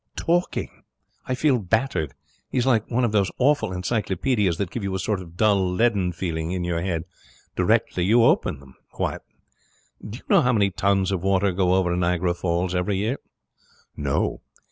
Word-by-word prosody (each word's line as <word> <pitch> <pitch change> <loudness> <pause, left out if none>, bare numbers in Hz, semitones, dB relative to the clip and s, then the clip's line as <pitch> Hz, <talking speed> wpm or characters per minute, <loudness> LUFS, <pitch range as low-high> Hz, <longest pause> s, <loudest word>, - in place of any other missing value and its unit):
'Talking. 175 +2 -1 0.5
I 130 - 0
feel 130 -2 +2
battered. 95 - -1 0.3
He's 125 -1 0
like 115 -5 +2
one 125 +1 +1
of 115 - 0
those 100 -3 +2
awful 140 -5 +2
encyclopedias 95 0 0
that 100 -3 -3
give 120 - -4
you 95 -1 -2
a - - 0
sort 100 0 -2
of 85 -1 -13
dull 100 -3 +3
leaden 100 -4 +2
feeling 85 -1 -3
in 90 -1 -2
your 85 -1 -1
head 85 -3 -2 0.5
directly 90 - +1
you 115 +6 +4
open 135 - +2
them. 70 -1 -16 1.3
Do 105 +2 -7
you - - -16
know - - +5
how 125 0 +2
many 100 -3 +2
tons 100 0 +1
of 95 -3 -1
water 95 +1 +2
go 90 0 +2
over 90 -2 +1
Niagara 90 0 +1
Falls 85 +1 -1
every 90 +2 0
year?' 110 +7 -1 0.8
'No.' - - -1
95 Hz, 170 wpm, -24 LUFS, 90-115 Hz, 1.3 s, know